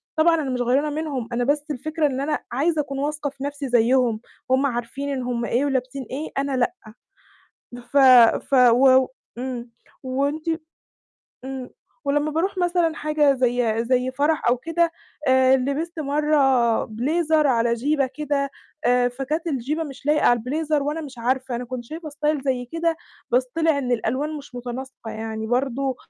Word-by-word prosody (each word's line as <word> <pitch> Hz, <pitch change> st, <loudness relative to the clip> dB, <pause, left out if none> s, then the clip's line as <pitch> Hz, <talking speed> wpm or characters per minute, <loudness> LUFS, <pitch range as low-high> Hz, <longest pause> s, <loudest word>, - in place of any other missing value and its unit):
طبعًا 330 Hz, +1 st, +4 dB
أنا 270 Hz, -, -3 dB
مش 250 Hz, -1 st, -1 dB
غَيرانة 270 Hz, +5 st, +2 dB
منهم 290 Hz, -6 st, -3 dB
أنا 245 Hz, +1 st, 0 dB
بس 290 Hz, +3 st, 0 dB
الفكرة 310 Hz, +4 st, -2 dB
إن 265 Hz, 0 st, -2 dB
أنا 295 Hz, +1 st, -1 dB
عايزة 300 Hz, +5 st, +1 dB
أكون 275 Hz, -1 st, -5 dB
واثقة 295 Hz, 0 st, -2 dB
في 270 Hz, 0 st, -10 dB
نَفْسي 285 Hz, -1 st, -4 dB
زيّهم، 240 Hz, -1 st, +3 dB, 0.3 s
هُم 265 Hz, +2 st, +3 dB
عارفين 250 Hz, +3 st, -3 dB
إن 265 Hz, -2 st, -2 dB
هُم 240 Hz, -1 st, -2 dB
إيه 260 Hz, +4 st, +1 dB
ولابِسين 265 Hz, 0 st, -2 dB
إيه 295 Hz, +4 st, -4 dB
أنا 275 Hz, -1 st, 0 dB
لأ. 250 Hz, +8 st, +1 dB, 1.0 s
بف 245 Hz, +3 st, -4 dB, 0.5 s
ف -, -, -7 dB
و 250 Hz, +1 st, +6 dB, 0.2 s
و -, -, -6 dB, 0.3 s
إمم 245 Hz, -2 st, -5 dB, 0.3 s
وأنتِ 280 Hz, +5 st, -1 dB, 1.0 s
إمم. 265 Hz, -1 st, -6 dB, 0.3 s
ولمّا 295 Hz, +2 st, +1 dB
باروح 370 Hz, +5 st, -1 dB
مثلًا 350 Hz, -2 st, +1 dB
حاجة 300 Hz, -2 st, +2 dB
زي 240 Hz, -3 st, +1 dB
زي 255 Hz, +1 st, +1 dB
فرح 290 Hz, 0 st, +1 dB
أو 245 Hz, -, +4 dB
كده 330 Hz, +5 st, 0 dB, 0.4 s
آآ، 260 Hz, 0 st, +5 dB
لبِست 295 Hz, +6 st, -3 dB
مرّة 275 Hz, -5 st, +2 dB
بليزر 305 Hz, +7 st, +1 dB
على 235 Hz, -2 st, +2 dB
جيبَة 275 Hz, +3 st, +1 dB
كده 280 Hz, -1 st, -1 dB, 0.3 s
آآ 245 Hz, 0 st, +3 dB
فكانت 275 Hz, +7 st, -3 dB
الجيبَة 295 Hz, +2 st, -1 dB
مش 275 Hz, -1 st, -10 dB
لايقة 300 Hz, 0 st, +3 dB
على 240 Hz, 0 st, +5 dB
البليزر 295 Hz, +4 st, -1 dB
وأنا 300 Hz, +3 st, -2 dB
مش 270 Hz, -5 st, -9 dB
عارفة 255 Hz, +1 st, -1 dB
أنا 245 Hz, -, -4 dB
كنت 245 Hz, 0 st, -6 dB
شايفة 315 Hz, +4 st, -7 dB
style 295 Hz, 0 st, -1 dB
زي 255 Hz, -2 st, 0 dB
كده 330 Hz, 0 st, 0 dB, 0.3 s
بس 250 Hz, +1 st, +3 dB
طلع 320 Hz, -3 st, +2 dB
إن 250 Hz, -3 st, -1 dB
الألوان 260 Hz, +7 st, -1 dB
مش 280 Hz, -3 st, -11 dB
مُتناسقة 245 Hz, -1 st, -7 dB
يعني 220 Hz, 0 st, -5 dB
برضه 260 Hz, +1 st, 0 dB
270 Hz, 165 wpm, -23 LUFS, 250-300 Hz, 1.0 s, و